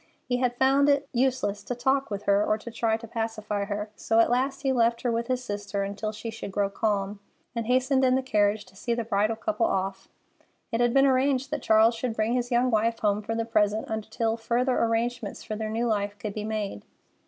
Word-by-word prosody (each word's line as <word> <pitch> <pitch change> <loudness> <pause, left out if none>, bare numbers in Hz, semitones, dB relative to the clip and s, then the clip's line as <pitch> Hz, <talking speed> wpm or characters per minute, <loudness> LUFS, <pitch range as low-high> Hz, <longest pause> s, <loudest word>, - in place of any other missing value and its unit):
He 245 -1 0
had 245 -1 0
found 275 +2 +4
it 285 0 +2
useless 245 -5 0
to 245 - -4
talk 265 +2 +1
with 200 -1 -4
her 200 +1 +3
or 215 - +1
to 235 +2 -9
try 225 -1 0
to 230 0 -10
pacify 215 -2 -3
her, 210 +1 -4
so 225 +1 +1
at 230 - +4
last 265 +3 0
he 270 - +2
left 235 -2 +2
her 245 - +1
with 230 0 -1
his 255 -1 -1
sister 205 -2 -3
until 205 +2 -3
she 225 +1 -6
should 220 -3 -7
grow 200 0 0
calm, 200 -1 -1 0.4
and 230 -1 -2
hastened 260 +2 +2
in 255 0 +4
the 265 - 0
carriage 210 -3 +1
to - - -20
see 235 +4 -2
the 235 - -2
bridal 215 0 +1
couple 325 +8 0
off. 195 - -2 0.6
It 230 - 0
had 240 0 +3
been 270 +2 +5
arranged 270 0 +2
that 300 -3 -2
Charles 220 +1 +5
should 230 0 -3
bring 220 +2 0
his 245 -1 0
young 250 +1 +2
wife 225 +1 +2
home 210 -1 +1
for 225 +2 -3
the 230 0 -1
present 215 -1 +1
until 225 +1 -2
further 245 +3 0
arrangements 230 -1 -1
for 215 - -4
their 215 0 -3
new 225 +2 -1
life 205 -2 -1
could 205 0 -5
be 210 0 -4
made. 210 - -3
225 Hz, 225 wpm, -27 LUFS, 210-250 Hz, 0.6 s, been